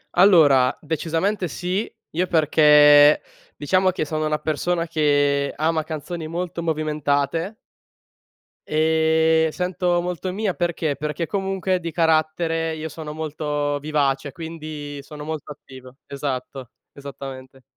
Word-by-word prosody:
Allora, 155 -9 +5
decisamente 165 +5 -1
sì, 180 +7 -3 0.2
io 180 +3 -1
perché, 150 -2 +6 0.4
diciamo 185 +5 +2
che 175 -4 -2
sono 155 +1 -2
una 150 0 0
persona 165 +3 -1
che 145 -3 +1
ama 160 +1 0
canzoni 160 +1 -6
molto 170 +1 -4
movimentate. 155 +2 -1 1.1
Ehm, 160 +1 +2
sento 180 0 -1
molto 180 +1 -4
mia, 200 -1 -1
perché? 170 -4 -1
Perché 150 +3 -3
comunque 190 -1 -1
di 165 - -4
carattere 160 0 +1
io 155 0 -5
sono 160 -1 -8
molto 150 -2 -2
vivace, 140 -2 -1
quindi 155 -3 -7
sono 150 +1 -10
molto 155 -1 -6
attivo. 130 -2 -13
Esatto. 135 -2 -5 0.2
Esattamente. 135 -2 -10
155 Hz, 115 wpm, -22 LUFS, 145-170 Hz, 1.1 s, perché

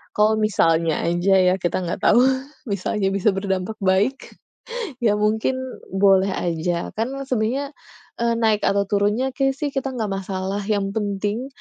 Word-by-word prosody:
kalau 215 +1 +4
misalnya 165 -6 +2
aja 175 +3 +2
ya 180 0 +4
kita 175 +1 0
nggak 170 - -4
tahu, 240 - +5 0.5
bisa 200 0 -2
aja 195 -2 +1
bisa 200 +2 +2
berdampak 195 +1 -2
baik, 195 +8 +1 0.7
ya 210 -2 +4
mungkin 220 +4 +1 0.4
boleh 195 0 +4
aja. 170 0 -2
Kan 230 +4 -1
sebenarnya, 260 +4 -1 0.5
eee, 235 0 +2
naik 220 -2 +2
atau 200 0 +2
turunnya 210 +6 +1
kayaknya 270 -1 +1
sih 290 +1 -2
kita 270 -1 -2
nggak 215 -4 -2
masalah, 195 0 -3
yang 200 -2 0
penting 205 +3 -2
205 Hz, 150 wpm, -22 LUFS, 190-220 Hz, 0.7 s, tahu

